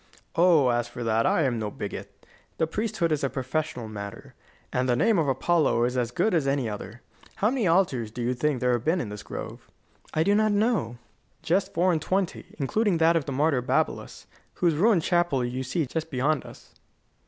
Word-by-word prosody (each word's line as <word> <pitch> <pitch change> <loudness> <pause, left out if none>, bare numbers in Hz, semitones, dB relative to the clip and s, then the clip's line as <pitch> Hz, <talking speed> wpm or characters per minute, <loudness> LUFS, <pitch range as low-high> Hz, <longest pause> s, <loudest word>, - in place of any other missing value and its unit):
"Oh, 165 -6 +5
as 120 0 0
for 120 0 -7
that, 115 0 +2
I 160 - +2
am 125 -4 0
no 105 -1 -2
bigot. - - -8 0.3
The 160 - +2
priesthood 170 -1 -1
is 150 -2 0
a 135 - +1
professional 130 -2 -3
matter, 100 -2 -8 0.4
and 125 0 0
the 120 - +3
name 220 - +3
of 155 - +1
Apollo 140 -2 +2
is 125 +1 0
as 120 -2 0
good 205 - 0
as 155 -5 +1
any 135 -3 0
other. 105 +2 -7 0.3
How 210 +3 +1
many 250 -7 0
altars 165 - +2
do 120 +2 -5
you 125 +2 +1
think 135 +1 -1
there 125 0 +2
have 120 -2 0
been 165 +6 +1
in 115 - -3
this 105 0 -7
grove?" - - -8 0.4
"I 155 - +1
do 200 +4 +3
not 215 0 +3
know." 205 - 0 0.5
"Just 185 +4 0
four 180 +2 +3
and 160 -3 0
twenty, 185 +2 -2
including 185 - +1
that 165 +1 +4
of 160 -4 +1
the 140 - -4
martyr 140 -1 +1
Babylas, 125 - -2 0.3
whose 170 -2 +2
ruined 180 +2 +3
chapel 175 -8 +1
you 125 +2 -3
see 150 +5 -1
just 160 +4 -4
beyond 145 +2 0
us. - - -15
150 Hz, 205 wpm, -26 LUFS, 125-175 Hz, 0.5 s, Oh